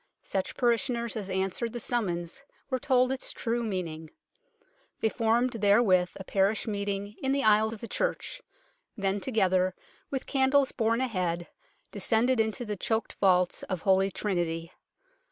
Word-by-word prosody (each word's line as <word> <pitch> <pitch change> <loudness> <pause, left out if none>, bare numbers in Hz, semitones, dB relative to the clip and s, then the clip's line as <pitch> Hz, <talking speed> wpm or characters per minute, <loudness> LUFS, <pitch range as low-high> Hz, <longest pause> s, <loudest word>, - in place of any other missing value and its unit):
Such 190 -1 -3
parishioners 235 -1 +1
as 205 -3 -4
answered 190 +5 -1
the 240 - -4
summons 185 -6 -2 0.3
were 260 - +1
told 255 +1 +3
its 265 - -2
true 235 +1 -2
meaning; 165 -7 -4 0.9
they 220 - +2
formed 235 +2 +1
therewith 205 -5 +4
a 190 - -7
parish 195 +2 +1
meet 205 -2 -2
ing 200 +1 -3
in 265 - 0
the 275 - +1
aisle 215 0 +5
of 225 - -8
the 230 - -6
church; - - -2 0.6
then 195 0 0
together, 185 -5 +1 0.3
with 270 -1 -3
candles 270 0 +3
borne 230 +1 +1
ahead, 180 -8 -1 0.4
descended 245 +2 +2
into 220 +3 0
the 210 -1 -3
choked 220 +3 -1
vaults 180 -2 +3
of 185 -4 -4
Holy 190 0 +4
Trinity. 170 -4 -2
210 Hz, 150 wpm, -28 LUFS, 190-235 Hz, 0.9 s, aisle